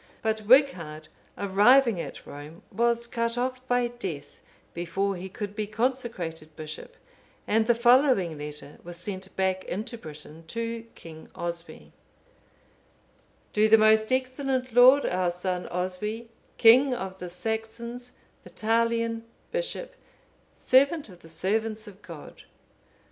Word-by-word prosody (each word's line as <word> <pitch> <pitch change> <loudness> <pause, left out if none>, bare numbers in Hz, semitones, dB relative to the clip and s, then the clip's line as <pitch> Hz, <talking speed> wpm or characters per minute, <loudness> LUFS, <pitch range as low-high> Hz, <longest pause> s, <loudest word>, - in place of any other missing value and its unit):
But 220 -2 -1
Wighard, 170 - +3 0.3
arriving 205 +2 +4
at - - -8
Rome, 150 +4 -10
was 235 +2 +1
cut 230 0 -2
off 255 +1 -2
by 245 -1 +2
death, 185 -12 -7 0.4
before 190 +4 -1
he 185 +2 -7
could 205 +1 -6
be 215 -1 -2
consecrated 215 - -3
bishop, 155 -1 -9 0.5
and 220 +1 +2
the 240 - +4
following 240 - +4
letter 150 -1 -8
was 175 0 -9
sent 190 +1 -7
back 190 0 0
into 220 +5 -5
Britain 155 -1 -11
to 230 +3 -4
King 160 -1 -12
Oswy:— 170 -1 -6 1.6
"_To 215 +1 +4
the 220 - +8
most 220 +1 +4
excellent 260 -1 -1
lord, 255 +4 +7
our 180 -1 +1
son, 180 +1 -3
Oswy, 200 +6 -3 0.3
king 250 +3 +6
of 190 -5 -6
the 180 - -6
__ - - -8
Saxons, 225 +5 -5 0.3
Vitalian,_(501)_ 230 +1 0 0.3
bishop, - - -3 0.6
servant 280 +1 +3
of 180 -2 -14
the 165 - -15
servants 215 +6 -1
of 200 0 -13
God. 165 -4 -11
215 Hz, 125 wpm, -27 LUFS, 180-240 Hz, 1.6 s, the